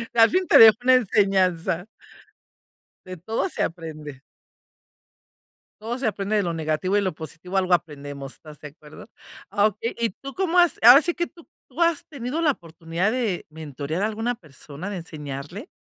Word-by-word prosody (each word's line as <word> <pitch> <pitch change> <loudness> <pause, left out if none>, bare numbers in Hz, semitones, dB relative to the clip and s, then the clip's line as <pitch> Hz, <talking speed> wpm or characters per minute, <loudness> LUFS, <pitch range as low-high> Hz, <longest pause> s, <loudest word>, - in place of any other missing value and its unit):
Al 225 -1 +6
fin 370 0 +1
te - - +6
dejó 220 -1 +9
una 255 0 +6
enseñanza. 190 -6 +1 1.2
De 185 -1 -9
todo 220 - -2
se - - -4
aprende. 155 -5 -7 1.6
Todo 235 +3 -4
se 260 - -1
aprende 205 0 -2
de 205 - +1
lo 170 -1 -2
negativo 160 +5 -1
y - - +2
lo 190 -2 -1
positivo 165 +4 -6
algo 185 -1 +2
aprendemos, 145 -5 -3
¿estás 150 -2 -14
de 150 - -9
acuerdo? 150 +1 -15 0.4
Ah 205 +1 +3
okey, 215 +2 -5
¿y 230 - +1
tú 275 +7 -10
cómo 360 -2 +1
has? 350 -1 +3
Ahora 245 +5 +9
sí 345 +1 -1
que, 345 0 -2
¿tú 335 -1 -19 0.2
tú 345 - -7
has 335 -3 +2
tenido 280 +1 -5
la 315 -3 +3
oportunidad 170 - -3
de 230 -8 -2
mentorear 155 +2 -5
a - - +3
alguna 225 +3 -2
persona, 155 +1 -10
de 200 - -5
enseñarle? 155 - -8
190 Hz, 175 wpm, -23 LUFS, 160-235 Hz, 1.6 s, dejó